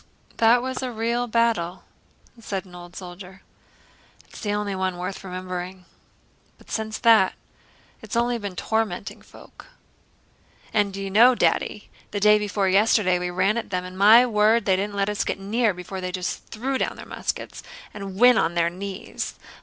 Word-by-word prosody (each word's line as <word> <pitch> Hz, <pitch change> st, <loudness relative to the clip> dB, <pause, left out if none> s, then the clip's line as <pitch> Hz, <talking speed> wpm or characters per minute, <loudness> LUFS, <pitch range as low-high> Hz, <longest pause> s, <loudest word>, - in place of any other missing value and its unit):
"That 235 Hz, +2 st, +4 dB
was 260 Hz, 0 st, -3 dB
a 255 Hz, -1 st, -3 dB
real 235 Hz, +2 st, -1 dB
battle," 225 Hz, -7 st, 0 dB, 0.6 s
said 200 Hz, -4 st, -4 dB
an 180 Hz, -, -16 dB
old 175 Hz, 0 st, -11 dB
soldier. 185 Hz, +1 st, -10 dB, 0.8 s
"It's -, -, -13 dB
the 205 Hz, -, -2 dB
only 205 Hz, -1 st, -1 dB
one 185 Hz, -1 st, -2 dB
worth 185 Hz, +2 st, -5 dB
remembering; 185 Hz, 0 st, -6 dB, 0.7 s
but -, -, -17 dB
since 220 Hz, -1 st, -3 dB
that... 225 Hz, -5 st, +4 dB, 0.7 s
it's -, -, -7 dB
only 235 Hz, 0 st, +1 dB
been 200 Hz, -3 st, -6 dB
tormenting 220 Hz, +2 st, -2 dB
folk." -, -, -16 dB, 1.1 s
"And 205 Hz, -2 st, +2 dB
do 195 Hz, -, -7 dB
you 195 Hz, 0 st, -4 dB
know, 240 Hz, +5 st, +6 dB
Daddy, 210 Hz, -, 0 dB, 0.2 s
the 205 Hz, -, -3 dB
day 210 Hz, +1 st, +5 dB
before 205 Hz, -1 st, -1 dB
yesterday 195 Hz, -1 st, +3 dB
we 180 Hz, 0 st, -2 dB
ran 185 Hz, +5 st, +1 dB
at -, -, -8 dB
them 180 Hz, -1 st, -2 dB
and, 185 Hz, 0 st, -9 dB
my 215 Hz, +6 st, +7 dB
word, 220 Hz, -1 st, +3 dB
they 190 Hz, -, +3 dB
didn't 200 Hz, +2 st, -3 dB
let 200 Hz, 0 st, 0 dB
us 210 Hz, -1 st, -1 dB
get -, -, -3 dB
near 215 Hz, +3 st, +1 dB
before 185 Hz, +1 st, -7 dB
they 185 Hz, 0 st, -3 dB
just 180 Hz, 0 st, -4 dB
threw 260 Hz, +4 st, -3 dB
down -, -, -1 dB
their -, -, -10 dB
muskets -, -, -5 dB, 0.3 s
and 195 Hz, -2 st, -7 dB
went 245 Hz, +3 st, +6 dB
on 170 Hz, -, 0 dB
their 170 Hz, 0 st, +2 dB
knees. 195 Hz, +2 st, -6 dB
200 Hz, 175 wpm, -24 LUFS, 185-225 Hz, 1.1 s, my